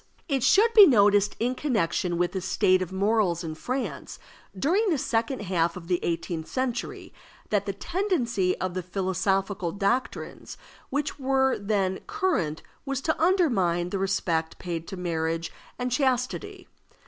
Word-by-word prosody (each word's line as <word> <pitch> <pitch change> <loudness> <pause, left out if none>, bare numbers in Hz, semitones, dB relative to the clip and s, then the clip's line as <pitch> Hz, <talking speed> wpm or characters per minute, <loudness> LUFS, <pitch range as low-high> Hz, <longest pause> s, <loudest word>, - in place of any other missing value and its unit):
It 275 -5 0
should 445 - +4
be 415 -3 +10
noticed 205 -4 +4
in 245 +2 +1
connection 195 - 0
with 175 0 +1
the 190 - -3
state 185 0 +2
of 185 - -4
morals 195 -3 +1
in 160 -1 -4
France 255 +11 -4 0.4
during 380 - +2
the 320 - +2
second 235 +1 -1
half 175 -3 0
of 170 -2 -10
the 180 -1 +1
eighteenth 165 -1 -3
century, 255 -2 -3 0.4
that 205 -1 +1
the 200 - -1
tendency 235 - 0
of 185 -1 -2
the 185 - -2
philosophical 190 0 -1
doctrines 200 +7 -2 0.3
which 290 +2 -2
were 265 0 +2
then 200 -2 0
current 375 - -1 0.2
was 275 -2 -2
to 315 +3 -1
undermine 195 - +2
the 195 - -2
respect 170 -4 -1
paid 170 -2 -5
to 190 - -6
marriage 165 -1 -2 0.3
and 250 0 -2
chastity. 265 +10 -1
200 Hz, 150 wpm, -26 LUFS, 180-265 Hz, 0.4 s, be